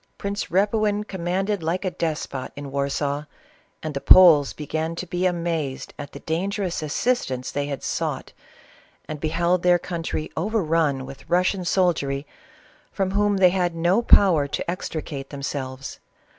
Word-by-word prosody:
Prince 200 +1 -3
Repuin 210 +2 +1
commanded 190 +1 -2
like 170 +4 -2
a 185 - 0
despot 150 -6 -3
in 145 - -7
a\v, 140 +1 -2 0.6
and 155 -1 -3
the 140 - -3
Poles 165 -6 +7
began 160 +2 -3
to 185 - -5
be 180 +1 0
amazed 165 -6 -2
at 145 - -7
the 140 - -10
dan 170 +5 -1
gerous 195 -5 -2
assistance 150 - -1
they 145 0 -2
had 140 -3 -5
sought, - - -3 0.7
and 155 -1 -5
beheld 170 +3 +1
their 180 0 +5
country 165 -3 -4
overrun 165 -8 0
\vith 135 0 -12
Russian 180 +2 +2
soldiery, 155 -7 +1 0.7
from 190 -1 -1
whom 205 0 +2
they 185 -2 +6
had 175 -2 0
no 175 +7 +2
power 180 -10 +5
to - - -4
extricate 155 -5 -5
themselves. 135 -2 -5
165 Hz, 145 wpm, -24 LUFS, 145-185 Hz, 0.7 s, Poles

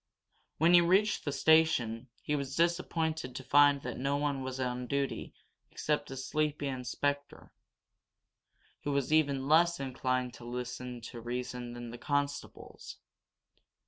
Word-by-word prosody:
When 165 +3 +4
he 175 - +9
reached 190 +5 +2
the 145 - 0
station 135 -7 +3 0.2
he 150 - 0
was 140 -1 -3
disappointed 165 -5 0
to 130 - -5
find 145 0 +5
that 125 -1 -5
no 140 +2 0
one 145 -2 -1
was 130 0 -5
on 125 -1 -2
duty 140 0 -2 0.4
except 150 -1 -1
a 135 - -6
sleepy 150 +2 -1
inspector, 140 +2 -3 1.3
who 145 - -1
was 140 +2 0
even 140 -4 +2
less 170 +2 +4
inclined 130 -2 -1
to 125 - -12
listen 125 0 -5
to 115 +1 -8
reason 125 0 -4
than 120 -1 -7
the 120 - -9
constables. 145 0 -3
140 Hz, 140 wpm, -31 LUFS, 125-150 Hz, 1.3 s, he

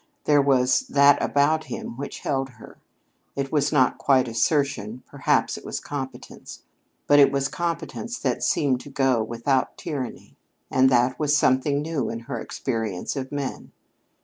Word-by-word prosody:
There 145 -1 +4
was 130 -2 +3
that 140 0 +5
about 155 +2 +2
him - - -6
which 140 +3 -7
held 135 -2 -1
her. - - -14 0.6
It 135 -1 -3
was 145 -1 +1
not 130 - +2
quite 130 -3 +3
assertion; 120 -1 -1
perhaps - - 0
it - - -18
was - - -4
competence. 135 -2 -8 0.4
But 145 - +5
it 140 - +6
was 140 0 0
competence 170 - -4
that - - -2
seemed 135 -4 +1
to - - -11
go 135 -4 +1
without 120 +4 -1
tyranny, 135 -6 -6 0.4
and 130 0 +4
that 125 0 +2
was 150 -1 +2
something 140 +1 +2
new 155 -6 -2
in 115 0 -5
her 115 - -5
experience 115 -6 -3
of 135 -1 -5
men. 145 -2 -5
135 Hz, 155 wpm, -24 LUFS, 125-145 Hz, 0.6 s, it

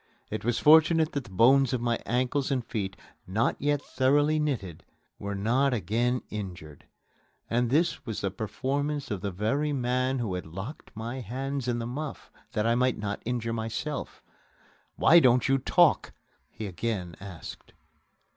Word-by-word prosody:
It 110 - -3
was 120 +1 +1
fortunate 160 +1 +5
that 140 -3 -3
the - - -12
bones 130 +7 +4
of 125 - +1
my 120 0 0
ankles 130 +3 0
and 130 -4 -1
feet, 100 -5 -3 0.3
not 105 +5 +1
yet 145 0 0
thoroughly 145 +4 +2
knitted, 100 - -2 0.4
were 100 0 -4
not 125 +7 +2
again 120 +5 0
injured. 90 -8 -7 0.7
And 120 +1 +2
this 165 +6 +1
was 110 -3 -4
the 100 - -1
performance 140 +7 -2
of 100 -3 -2
the 100 - -2
very 135 +11 0
man 130 0 0
who 115 -6 -2
had 90 -2 -4
locked 95 - -8
my 115 +4 -5
hands 130 +3 -4
in 120 -1 0
the 115 - -3
muff, 140 +5 -6 0.2
that 105 - 0
I 115 - +3
might 125 0 +2
not 105 -1 -4
injure 115 -1 -2
myself! 115 +7 -4 0.7
"Why 170 - +7
don't 125 -5 +4
you 135 0 +3
talk?" 170 +5 +3 0.4
he 110 - -7
again 95 -2 -3
asked. 95 -4 -9
120 Hz, 160 wpm, -28 LUFS, 105-135 Hz, 0.7 s, Why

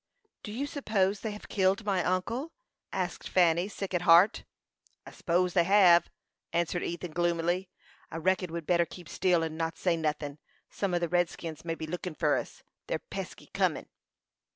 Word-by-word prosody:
"Do 210 - -7
you 255 +6 -2
suppose 210 -9 0
they 220 - -3
have 210 0 -8
killed 195 +2 +1
my 190 -4 +1
uncle?" 230 - -1 0.4
asked 180 -2 -3
Fanny, 175 0 +3
sick 195 -2 -6
at 175 - +1
heart. 175 +5 +5 0.6
"I - - -10
s'pose 180 0 0
they 175 - +4
hev," 175 -3 +6 0.4
answered 170 +1 0
Ethan, 170 0 -4
gloomily. 175 +2 0 0.4
"I - - -6
reckon 180 +1 0
we'd 170 -1 -5
better 170 0 +3
keep 175 -3 -11
still, 175 0 +2
and 160 0 -4
not 165 0 -2
say 175 -2 +1
nothin'. 150 -2 -3 0.3
Some 195 -3 -1
o' - - +3
the 170 0 0
redskins 170 -2 -1
may 165 -1 -2
be 160 - -5
lookin' 175 +1 -5
for 150 -3 +2
us. - - -5 0.2
They're - - 0
pesky - - -8
cunnin'." - - 0
175 Hz, 175 wpm, -29 LUFS, 165-190 Hz, 0.6 s, hev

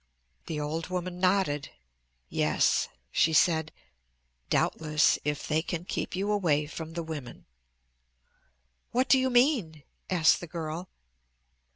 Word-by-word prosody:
The 155 -2 -3
old 155 +2 -3
woman 180 0 -4
nodded. 185 -6 +1 0.6
"Yes," - - +2 0.2
she 160 - +3
said, 160 -1 +3 0.8
"doubtless; 155 -1 +2
if 150 0 -2
they 155 +1 +1
can 170 0 -4
keep - - -3
you 200 +3 -1
away 160 -8 +2
from 160 +1 -7
the 170 0 -3
women." 155 -6 -8 1.4
"What 255 +3 +1
do 265 - +6
you 260 0 +1
mean?" 240 - +2 0.3
asked 170 -4 +4
the 175 - -8
girl. 165 +2 -5
165 Hz, 125 wpm, -28 LUFS, 155-185 Hz, 1.4 s, do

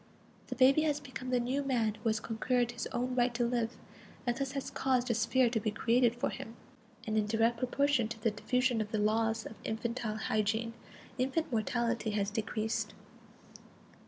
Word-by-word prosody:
The - - -4
baby 270 +3 +6
has 300 -2 +1
become 260 -2 -7
the 250 -1 +2
new 255 +4 0
man 240 -6 +1
who 225 +2 -2
has 220 0 +1
conquered 240 +2 0
his 240 -1 -4
own 250 +1 -2
right 245 0 +3
to 240 0 +2
live, 235 -1 0 0.5
and 240 -1 +1
thus 275 +1 -3
has 275 -1 -4
caused 255 -2 +1
a - - +3
sphere 250 +3 +3
to 230 - +1
be 215 - -1
created 235 +2 +2
for 245 +3 -1
him. 225 - -7 0.5
And 215 -1 +1
in 210 - 0
direct 225 +2 +2
proportion 260 -1 +2
to 225 0 -7
the 220 0 +1
diffusion 250 +2 +1
of 210 - -3
the 215 - -1
laws 220 +1 +1
of - - -7
infantile 225 0 -2
hygiene, 220 +1 0 0.5
infant 270 +4 0
mortality 235 0 0
has 200 0 0
decreased. 220 0 -2
235 Hz, 185 wpm, -32 LUFS, 220-255 Hz, 0.5 s, baby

